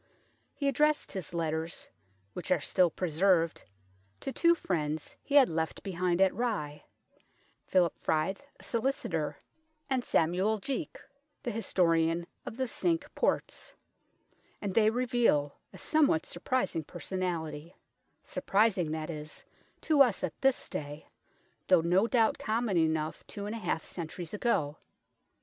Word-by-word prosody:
He 280 - -1
addressed 300 +3 +2
his 190 -3 -5
letters, 160 -1 -2 0.5
which 180 - -6
are 185 - +4
still 180 +4 +3
preserved, 170 0 +2 0.6
to 270 - -3
two 340 +4 +4
friends 160 - -2
he 285 - -3
had 275 -3 +8
left 160 0 -2
behind 180 -2 0
at 190 -1 +5
Rye, 190 -11 -2 0.8
Philip 180 -3 +3
Fryth, 160 +5 0 0.2
a - - -14
solicitor, 255 +4 -1 0.5
and 260 -2 +1
Samuel 185 +6 +2
Jeake, 275 - -4 0.5
the 240 - -2
historian 170 -5 +1 0.2
of 225 - -6
the 260 - 0
Cinque 330 +3 -1
Ports; - - -1 0.8
and 200 -2 -3
they 215 0 +5
reveal 235 - +2 0.2
a - - -12
somewhat 290 - +2
surprising 185 -3 -1
personality 170 -2 -4 0.5
surprising, 195 -5 +1
that 155 +1 -3
is, 150 -1 -8 0.4
to 305 -3 +4
us 245 -7 +4
at - - -1
this 270 -1 +2
day, 145 +1 -6 0.6
though 180 -3 +6
no 180 +6 +3
doubt 230 -2 +2
common 220 -2 0
enough 160 -1 0
two 200 -1 -6
and 210 - -4
a 230 - -4
half 165 -6 -2
centuries 170 0 -6
ago. 160 -10 0
185 Hz, 130 wpm, -30 LUFS, 160-235 Hz, 0.8 s, had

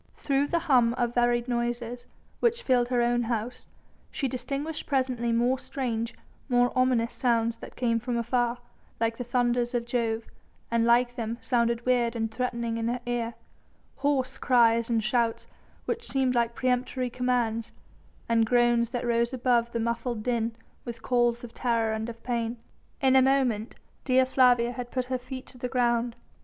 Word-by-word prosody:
Through 280 0 0
the 340 - +1
hum 245 -6 +4
of 240 -1 -1
varied 240 0 +2
noises 240 0 -3 0.3
which 470 0 +1
filled 245 -2 +3
her 245 -1 +1
own 240 0 +2
house, 235 +1 -3 0.4
she 275 - -2
distinguished 275 +5 -4
presently 255 -4 0
more 245 +3 +2
strange, 235 -5 -3 0.3
more 245 0 +3
ominous 255 -2 +2
sounds 230 -2 +1
that - - -11
came 230 -2 +1
from 240 +1 -2
afar, 240 +1 0 0.4
like 230 0 0
the 245 - -3
thunders 240 0 0
of 235 -1 -1
Jove, 230 -2 -1 0.5
and 230 0 +2
like 240 +1 +3
them 230 -1 -3
sounded 235 -1 0
weird 245 -2 +2
and 225 -1 -2
threatening 235 -1 -2
in 230 0 -1
her 245 +1 -1
ear; 235 -1 -2 0.6
hoarse 275 -2 0
cries 235 -2 +3
and 225 -2 +1
shouts 230 0 0 0.4
which 470 +1 -3
seemed 265 -2 +1
like 235 -1 +1
peremptory 255 -1 -1
commands, 240 -3 -1 0.6
and 230 -1 +3
groans 240 -1 +3
that 245 0 -3
rose 235 +1 +1
above 240 -2 +1
the 235 - -2
muffled 235 0 -2
din 230 -1 -1 0.3
with 230 -1 -8
calls 240 -1 +1
of 235 -1 -9
terror 230 -2 0
and 220 +1 -3
of 230 0 -10
pain. 235 -1 -2 0.4
In 265 -1 +4
a 265 - +7
moment 255 -5 +1 0.3
Dea 260 0 +4
Flavia 245 -2 +4
had 245 -1 -6
put 255 -1 -2
her 255 - 0
feet 255 +1 -8
to 250 - -14
the 250 - -3
ground. 240 -1 +1
240 Hz, 170 wpm, -27 LUFS, 235-250 Hz, 0.6 s, a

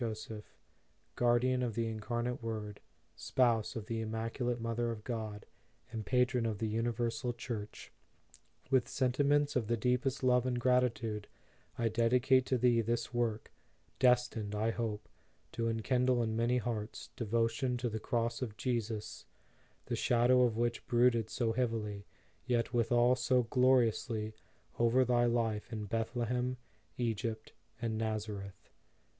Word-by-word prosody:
JOSEPH; 110 -1 -6 0.6
Guardian 125 +1 +2
of 120 -3 -2
the 115 0 0
Incarnate 120 +3 -3
Word, 110 -3 -5 0.4
Spouse 120 -4 +1
of 110 -3 -5
the 115 0 -3
Im 110 - -4
maculate 115 +2 -2
Mother 115 +1 -1
of 110 -2 -5
God, 110 -4 -5 0.5
and 110 -1 -4
Patron 125 -2 +2
of 110 -2 -2
the 110 - -1
Universal 115 +2 -1
Church; 115 -3 -6 0.8
with 130 -3 +3
sentiments 145 +3 +2
of 120 -5 0
the 115 +1 +1
deepest 125 +4 0
love 125 0 +3
and 125 -1 0
gratitude, 120 -4 +1 0.5
I 115 - +1
dedicate 125 +3 +3
to 130 - +2
thee 120 -1 +3
this 115 +2 -2
work, 115 -2 -1 0.5
destined, 120 -4 +2
I 110 +2 +1
hope, 110 -2 -3 0.4
to 115 0 -1
enkindle 125 +2 +1
in 110 -1 -1
many 120 +2 +2
hearts, 115 -2 -4
devotion 115 +2 0
to 120 0 -2
the 110 -1 -3
Cross 115 +1 -1
of 110 -5 -4
Jesus, 115 -3 -3 0.6
the - - -2
shadow 125 +1 +4
of 120 -3 +2
which 120 0 0
brooded 120 -2 +3
so 115 -3 0
heavily, 110 -4 -2 0.4
yet 120 -1 0
withal 120 +1 +4
so 125 0 +2
gloriously, 120 -3 +2 0.5
over 120 +2 +4
thy 120 0 +3
life 115 -3 0
in 110 -2 -4
Bethle 115 +3 -1
hem, 125 +2 -1 0.4
Egypt, 115 -2 -2 0.3
and 115 -2 -2
Nazareth. 105 -3 -4
115 Hz, 140 wpm, -33 LUFS, 110-125 Hz, 0.8 s, shadow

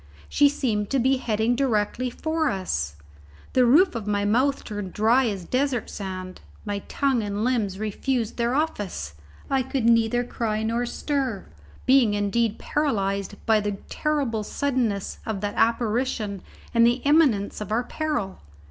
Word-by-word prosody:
She 285 0 +4
seemed 220 -8 -1
to 275 - +1
be 260 +2 +3
heading 225 -1 0
directly 245 -1 0
for 315 +4 -1
us. 75 - -2 0.6
The 250 -1 +4
roof 350 +10 +5
of 225 -3 -5
my 205 -1 0
mouth 255 +7 +2
turned 205 -4 -6
dry 235 +4 +3
as 195 -5 -3
desert 255 +1 -1
sand; 185 -2 -6 0.2
my 205 -1 -2
tongue 270 -4 +1
and 205 0 -2
limbs 225 -6 0
refused 220 +3 -2
their 235 +1 +1
office; 205 - -2 0.3
I 270 -1 +1
could 260 -1 -2
neither 230 +1 +3
cry 220 -3 -2
nor 230 +2 0
stir, 265 -6 -2 0.4
being 255 -5 +5
indeed 210 +2 0
paralyzed 200 -9 -1
by 220 -1 +4
the 205 0 -2 0.2
terrible 280 -8 -1
suddenness 240 -6 -1
of 220 -3 -3
that 205 -1 -2
apparition 230 -3 0 0.3
and 230 -1 +5
the 240 +2 +3
imminence 280 -11 +3
of 210 - -5
our 230 +3 +1
peril. 270 -10 -3
230 Hz, 150 wpm, -25 LUFS, 205-260 Hz, 0.6 s, roof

